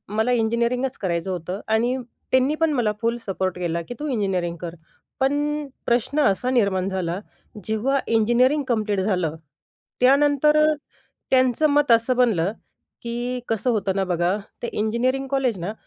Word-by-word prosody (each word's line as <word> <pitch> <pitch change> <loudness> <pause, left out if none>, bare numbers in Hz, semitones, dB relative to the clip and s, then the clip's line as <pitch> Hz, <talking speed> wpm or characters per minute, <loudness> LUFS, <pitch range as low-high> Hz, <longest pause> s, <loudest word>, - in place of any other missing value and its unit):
मला 220 +3 +2
इंजिनिअरिंगच 235 +3 0
करायचं 175 -1 -2
होतं 180 +2 -4
आणि 240 +3 +2 0.4
त्यांनी 260 +4 +3
पण 325 -1 +3
मला 235 -5 +1
फुल 235 +1 0
सपोर्ट 190 -2 -2
केला 170 -1 -1
की - - -3
तू 300 - -3
इंजिनिअरिंग 190 -7 -1
कर. 170 -1 -6 0.4
पण 290 +2 0 0.2
प्रश्न 240 +5 +1
असा 250 +2 +2
निर्माण 200 -6 +1
झाला, 185 -1 -2 0.5
जेव्हा 245 +6 0
इंजिनिअरिंग 240 +6 +3
कम्प्लीट 215 -4 0
झालं, 180 -6 0 0.7
त्यानंतर 290 +3 +4
अ, 310 0 +4 0.6
त्यांचं 260 +3 +3
मत 290 -3 +2
असं 230 +2 +3
बनलं 210 -7 +2 0.5
की 240 +1 -3
कसं 225 +3 0
होतं 200 -3 0
ना 195 - +1
बघा, 180 +1 0 0.3
ते 235 - -2
इंजिनिअरिंग 245 +5 0
कॉलेज 260 -7 0
ना 180 +5 -4
235 Hz, 145 wpm, -23 LUFS, 190-260 Hz, 0.7 s, त्यानंतर